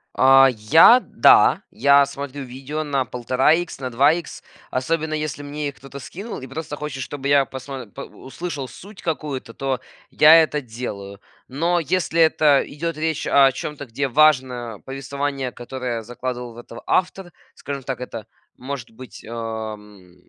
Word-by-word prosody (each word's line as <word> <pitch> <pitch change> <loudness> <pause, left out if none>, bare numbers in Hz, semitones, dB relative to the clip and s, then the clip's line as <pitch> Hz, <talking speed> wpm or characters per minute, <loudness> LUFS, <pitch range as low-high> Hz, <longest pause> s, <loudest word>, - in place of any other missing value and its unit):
А, 135 0 +7
я, 155 - +6
да, - - +4
я 140 0 +5
смотрю 140 0 -7
видео 135 +4 -5
на 140 -3 -1
1,5 125 +4 +1
икс, 175 -2 -2
на 130 -2 -4
2 135 +5 +4
икс, 170 -1 -5 0.3
особенно 155 +4 -1
если 155 -2 -3
мне 145 0 -4
их 140 - -12
кто-то 135 0 -11
скинул 195 - -8
и 130 - -8
просто 145 +3 -6
хочет, 145 -2 -6
чтобы 140 +1 -5
я 140 -1 +4
посмо 130 0 -8
по 115 +6 -11
э, - - -6
услышал 145 -1 -7
суть 195 - -13
какую-то, 150 -7 -4
то 135 -1 -2 0.3
я 155 +2 +7
это 150 -1 -2
делаю. 110 -6 -7 0.3
Но 170 +7 0
если 170 +1 -1
это 155 -3 +4
идет 165 +2 -4
речь 160 -1 -2
о 135 -1 +5
чем-то, 145 +2 -6
где 135 +3 -3
важно 125 -6 +2
повествование, 135 -1 -4
которое 120 -1 -5
закладывал 125 +1 -6
в - - -16
это 120 0 -11
автор, 180 0 -1 0.2
скажем 140 -1 -6
так, 130 -1 -5
это 115 -4 -7 0.3
может 130 -2 -7
быть, 115 -3 -12
ам, 110 -5 -7
135 Hz, 160 wpm, -22 LUFS, 125-150 Hz, 0.3 s, А